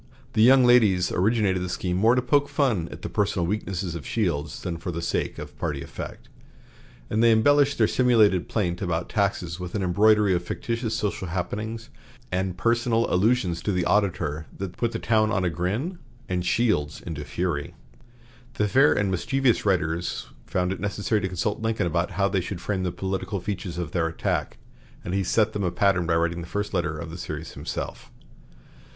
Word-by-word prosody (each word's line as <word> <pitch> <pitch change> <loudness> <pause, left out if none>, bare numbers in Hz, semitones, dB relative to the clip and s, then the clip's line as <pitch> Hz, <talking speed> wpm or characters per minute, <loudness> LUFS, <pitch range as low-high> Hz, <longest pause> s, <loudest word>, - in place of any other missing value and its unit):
The 110 - +2
young 130 +2 +7
ladies 105 -8 +4
originated 100 -1 +2
the 90 - -3
scheme 90 0 -2
more 110 +6 +4
to 125 - +1
poke 145 +3 +2
fun 115 - +1
at - - -10
the - - -2
personal 100 -4 0
weaknesses 95 -2 -2
of 85 -4 -6
Shields 75 - -2
than 85 -2 -3
for 90 +3 -6
the 85 -1 -3
sake 85 - -2
of - - -8
party 75 -4 -2
effect, - - -8 0.8
and 110 - +2
they 115 0 +6
embellished 145 +5 +4
their 110 - +4
simulated 110 -8 +3
plaint 90 -5 -1
about 85 -2 -2
taxes 95 -5 -1
with 90 +1 -6
an 100 - -1
embroidery 105 +2 +4
of 85 0 0
fictitious 115 +4 -3
social 105 -3 -2
happenings 110 +6 -4 0.4
and 90 0 -1
personal 115 +2 +2
allusions 95 -4 +2
to 105 - -1
the 90 -2 0
auditor 85 -7 0
that 95 -2 -5
put 120 -1 -1
the - - -3
town 110 -1 +2
on 95 -2 +1
a 85 - +1
grin 105 - -2 0.3
and 90 -1 -2
Shields 85 -11 +1
into 80 -3 -6
fury. 80 -3 -3 0.8
The 105 - +1
fair 135 +7 +5
and 100 -2 0
mischievous 125 +5 +1
writers 85 -2 -1 0.2
found 90 0 0
it - - -8
necessary 105 +2 -1
to 95 - -1
consult 95 +4 -2
Lincoln 115 -3 0
about 85 +1 0
how 100 -1 +3
they 95 -1 0
should 90 0 -5
frame 95 +1 -2
the 90 -1 -1
political 95 +2 -3
features 90 -2 -4
of 85 -3 -3
their 80 -1 +1
attack, 80 - -2 0.5
and 90 - -3
he 95 0 +1
set 110 +4 +2
them 100 - -2
a 90 - +1
pattern 95 -2 +2
by 85 - +2
writing 85 +1 0
the 85 - -8
first 105 +2 -3
letter 80 -3 -1
of 80 +1 -6
the 85 - -8
series 80 -1 -6
himself. - - -6
95 Hz, 190 wpm, -25 LUFS, 85-110 Hz, 0.8 s, young